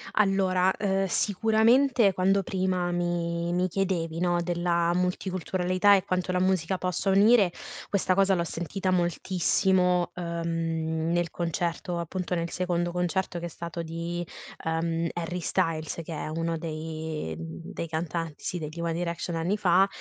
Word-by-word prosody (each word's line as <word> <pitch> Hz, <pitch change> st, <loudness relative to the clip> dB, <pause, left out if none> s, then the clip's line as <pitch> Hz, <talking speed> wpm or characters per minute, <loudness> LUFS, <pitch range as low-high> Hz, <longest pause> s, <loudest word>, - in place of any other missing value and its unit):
Allora, 190 Hz, -2 st, +3 dB
ehm, 195 Hz, -1 st, 0 dB
sicuramente, 220 Hz, +4 st, +3 dB
quando 190 Hz, +2 st, +3 dB
prima 185 Hz, -2 st, 0 dB
mi 170 Hz, -1 st, -1 dB
mi 180 Hz, +1 st, +2 dB
chiedevi, 170 Hz, -3 st, -1 dB
no, 175 Hz, -1 st, +1 dB
della 170 Hz, 0 st, +1 dB
multiculturalità 185 Hz, +1 st, +2 dB
e 190 Hz, -, +1 dB
quanto 185 Hz, 0 st, -1 dB
la 180 Hz, -, +1 dB
musica 185 Hz, -1 st, +1 dB
possa 185 Hz, +2 st, -1 dB
unire, 200 Hz, -1 st, +5 dB, 0.4 s
questa 190 Hz, -2 st, +1 dB
cosa 195 Hz, 0 st, +4 dB
l'ho 170 Hz, -, 0 dB
sentita 180 Hz, +3 st, -3 dB
moltissimo, 180 Hz, +1 st, +2 dB
ehm, 165 Hz, -1 st, -2 dB
nel 175 Hz, -1 st, +1 dB
concerto, 170 Hz, +1 st, -2 dB
appunto, 180 Hz, +1 st, -3 dB
nel 170 Hz, 0 st, -2 dB
secondo 175 Hz, -1 st, -1 dB
concerto 180 Hz, 0 st, -1 dB
che 175 Hz, -, -5 dB
è -, -, -2 dB
stato 170 Hz, 0 st, -6 dB
di, 170 Hz, +1 st, -4 dB, 0.4 s
uhm, 165 Hz, 0 st, 0 dB
Harry 175 Hz, +1 st, -3 dB
Styles, 160 Hz, -1 st, -1 dB
che 165 Hz, -, -7 dB
è 155 Hz, -, -4 dB
uno 165 Hz, +1 st, -2 dB
dei 155 Hz, -, -4 dB
dei 80 Hz, -, -6 dB
cantanti, 160 Hz, -1 st, -4 dB
sì, 180 Hz, -, -2 dB
degli 155 Hz, +2 st, -6 dB
one 170 Hz, -1 st, -1 dB
direction, 170 Hz, 0 st, -3 dB
anni 175 Hz, +6 st, 0 dB
fa 190 Hz, 0 st, +4 dB
175 Hz, 145 wpm, -27 LUFS, 165-185 Hz, 0.4 s, unire